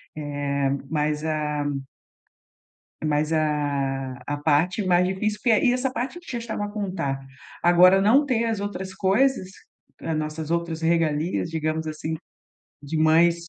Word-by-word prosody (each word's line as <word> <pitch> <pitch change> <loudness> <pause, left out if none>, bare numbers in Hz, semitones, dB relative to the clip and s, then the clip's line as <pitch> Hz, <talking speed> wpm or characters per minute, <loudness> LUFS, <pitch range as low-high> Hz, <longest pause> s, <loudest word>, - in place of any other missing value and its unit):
eh, 145 -2 -1 0.2
mas, 150 -1 0
ah, 150 -2 -1 1.4
mas, 150 +1 +1
ah, 140 -4 0
a 145 - -2
parte 165 +8 +1
mais 180 0 +4
difícil 210 +3 -2
porque 230 -4 +4
e 245 - +5
essa 255 +1 0
parte 260 +8 -3
que 350 - -12
já 240 - -2
estava 230 -3 -4
a - - -7
contar 185 -10 -2 0.4
agora 180 +2 +6
não 240 +9 +5
ter 235 -4 +1
as 225 -3 -1
outras 190 -2 -5
coisas, 195 +2 +2 0.5
as 160 -1 -2
nossas 155 0 -4
outras 170 -1 -2
regalias 165 0 +1
digamos 160 0 -2
assim, 155 +1 -4 0.7
de 145 +3 -4
mães, 160 +2 +5
165 Hz, 140 wpm, -24 LUFS, 150-200 Hz, 1.4 s, agora